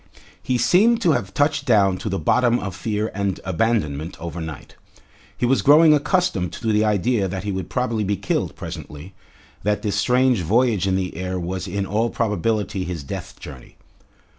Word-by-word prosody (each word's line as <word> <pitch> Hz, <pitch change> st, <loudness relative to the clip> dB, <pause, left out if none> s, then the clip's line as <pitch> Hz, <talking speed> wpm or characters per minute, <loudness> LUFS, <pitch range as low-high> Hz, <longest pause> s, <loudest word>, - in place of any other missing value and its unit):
He 125 Hz, -, 0 dB
seemed 205 Hz, -, +4 dB
to 170 Hz, -, +4 dB
have 110 Hz, -9 st, -1 dB
touched 145 Hz, +6 st, 0 dB
down 100 Hz, -5 st, +3 dB
to -, -, -4 dB
the 95 Hz, -, -1 dB
bottom 120 Hz, +8 st, +2 dB
of 100 Hz, -6 st, -5 dB
fear 105 Hz, +2 st, -2 dB
and 100 Hz, -1 st, -2 dB
abandonment 85 Hz, -5 st, -1 dB
overnight. 80 Hz, -2 st, -7 dB, 0.6 s
He -, -, 0 dB
was 130 Hz, +2 st, +2 dB
growing 155 Hz, +2 st, +6 dB
accustomed 145 Hz, -, 0 dB
to 110 Hz, -2 st, -2 dB
the 105 Hz, +1 st, +3 dB
idea 105 Hz, 0 st, +1 dB
that 95 Hz, +1 st, -5 dB
he 105 Hz, -, -2 dB
would 95 Hz, -1 st, -4 dB
probably 115 Hz, -4 st, -1 dB
be 100 Hz, 0 st, -1 dB
killed 95 Hz, +1 st, -2 dB
presently, 75 Hz, +6 st, -8 dB, 0.5 s
that 105 Hz, +2 st, -1 dB
this 105 Hz, -2 st, -1 dB
strange 125 Hz, +2 st, +2 dB
voyage 105 Hz, +1 st, +2 dB
in 95 Hz, -, +1 dB
the 95 Hz, -1 st, -2 dB
air 90 Hz, +1 st, -3 dB
was 90 Hz, +2 st, -4 dB
in 100 Hz, +2 st, -2 dB
all 110 Hz, +4 st, 0 dB
probability 105 Hz, -3 st, -1 dB
his 85 Hz, -4 st, -5 dB
death 70 Hz, -, -7 dB
journey. -, -, -11 dB
105 Hz, 175 wpm, -22 LUFS, 95-120 Hz, 0.6 s, growing